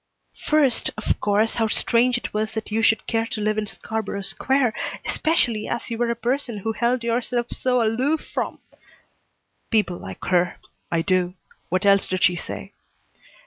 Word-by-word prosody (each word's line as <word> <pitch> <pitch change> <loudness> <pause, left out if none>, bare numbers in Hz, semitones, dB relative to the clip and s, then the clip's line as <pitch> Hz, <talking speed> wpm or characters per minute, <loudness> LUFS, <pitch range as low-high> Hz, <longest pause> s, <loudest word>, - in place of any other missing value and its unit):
"First, 290 -6 +3
of 215 - -1
course, 210 +2 +2
how 225 -1 +2
strange 240 +3 +2
it - - -6
was 215 +1 -1
that 220 -1 -4
you 220 +1 +1
should 220 0 +3
care 225 0 0
to 220 - -4
live 215 0 +1
in 210 - -3
Scarborough 215 -2 -4
Square, 265 +3 +2 0.3
especially 240 -9 +1
as 235 - -3
you 230 - -3
were 240 -1 +1
a 235 - 0
person 240 0 -1
who 220 +3 -2
held 235 +2 0
yourself 240 +1 -1
so 250 -2 +1
aloof 255 +8 +1
from - - -3 0.6
" - - -47
"People 210 -6 +1
like 95 0 -8
her. 180 -1 +2 0.3
I 165 -1 +1
do. 185 -1 +1 0.3
What 185 +3 0
else 200 -1 +5
did 185 0 -1
she 180 - +5
say?" 115 - -6
225 Hz, 175 wpm, -23 LUFS, 200-240 Hz, 0.6 s, else